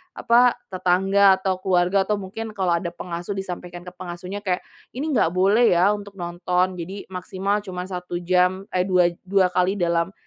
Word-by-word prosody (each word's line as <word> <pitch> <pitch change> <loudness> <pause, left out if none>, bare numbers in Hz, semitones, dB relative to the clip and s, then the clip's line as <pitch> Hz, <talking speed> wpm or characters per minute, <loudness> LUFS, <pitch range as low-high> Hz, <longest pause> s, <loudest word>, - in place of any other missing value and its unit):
apa, 240 +1 +4 0.2
tetangga, 190 +2 +4
atau 190 -1 -2
keluarga, 185 +1 +2
atau 210 - +1
mungkin 210 +3 -7
kalau 185 -3 0
ada 170 -1 -6
pengasuh 175 +3 -5
disampaikan 180 -2 -6
ke 180 - -9
pengasuhnya, 180 +2 -7
kayak, 185 -3 -2 0.3
"Ini 270 - -3
nggak 180 - +1
boleh 200 +2 +4
ya 185 +4 +4
untuk 200 -1 -6
nonton 180 +1 -1
jadi 190 +4 -6
maksimal 190 +3 -2
cuma 185 -3 -6
1 180 -1 -6
jam, 180 +2 +2
eh, 185 +1 0
dua 180 -2 +3 0.2
dua 190 -2 +3
kali 180 +2 +2
dalam, 170 0 0
185 Hz, 170 wpm, -23 LUFS, 180-195 Hz, 0.3 s, apa